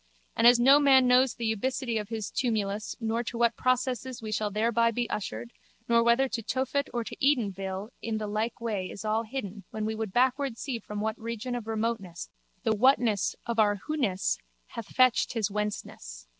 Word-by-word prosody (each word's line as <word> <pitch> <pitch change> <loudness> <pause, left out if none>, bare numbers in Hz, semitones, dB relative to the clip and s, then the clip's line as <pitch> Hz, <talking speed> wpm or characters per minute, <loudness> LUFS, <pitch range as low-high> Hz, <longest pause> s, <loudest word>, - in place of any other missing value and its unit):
And 230 - +5
as 240 0 +7
no 270 +4 +7
man 265 -3 +5
knows 250 0 +4
the 220 -1 -1
ubicity 240 0 -1
of 210 - -11
his 220 -3 -4
tumulus 210 -4 -1
nor 225 0 -1
to 235 - -5
what 235 -1 +2
processes 255 -1 -1
we 220 -1 -6
shall 215 0 0
thereby 230 +3 +2
be 235 +1 -2
ushered 115 - -4 0.3
nor 235 0 +4
whether 235 +3 +3
to 240 - -3
Tophet 265 +4 -1
or 240 -1 -2
to - - -8
Edenville 200 -7 0
in 225 -1 -2
the 215 - -3
like 215 +3 -2
way 210 -6 -3
is 200 - -8
all 215 +1 +1
hidden 215 -4 -6
when 215 -1 -4
we 220 - -1
would 220 -2 -4
backward 255 +2 +1
see 250 -2 -4
from 210 -2 -6
what 220 +1 -2
region 230 +2 -4
of 240 -3 -4
remoteness 220 -6 -3 0.3
the 220 -3 +2
whatness 225 -3 +3
of 235 -1 -2
our 205 -2 +3
whoness 250 -12 0 0.3
hath 230 -3 -7
fetched 255 -2 +3
his 215 -4 -1
whenceness. 200 - -5
225 Hz, 190 wpm, -28 LUFS, 210-245 Hz, 0.3 s, as